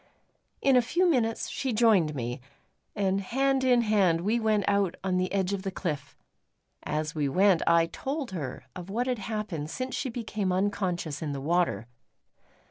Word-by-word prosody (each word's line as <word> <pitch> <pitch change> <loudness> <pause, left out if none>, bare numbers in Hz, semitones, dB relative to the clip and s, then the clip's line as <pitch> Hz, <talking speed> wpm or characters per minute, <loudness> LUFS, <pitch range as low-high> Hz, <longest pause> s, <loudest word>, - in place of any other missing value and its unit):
In 270 -1 +5
a 250 - +6
few 345 +10 +1
minutes 235 -8 +1
she 265 -3 -2
joined 210 -9 +3
me; 120 0 -4 0.5
and 195 -2 +1
hand 270 +6 +1
in 250 -2 +4
hand 195 -7 +2
we 215 +6 +1
went 215 -2 +1
out 200 -3 +2
on 185 -1 0
the 185 0 0
edge 195 -1 0
of 195 - -2
the 195 - -3
cliff. 150 -7 -4 0.6
As 155 +1 -2
we 145 -3 0
went, 185 +3 +4
I 170 0 +5
told 270 - -4
her 135 -7 -5
of 180 +1 -8
what 235 +5 -1
had 250 -3 -1
happened 200 -8 -4
since 255 +7 -4
she 265 - -2
became 215 -5 -2
unconscious 180 -5 -1
in 150 -3 -3
the 140 - -4
water. 170 -4 0
195 Hz, 175 wpm, -28 LUFS, 165-230 Hz, 0.6 s, a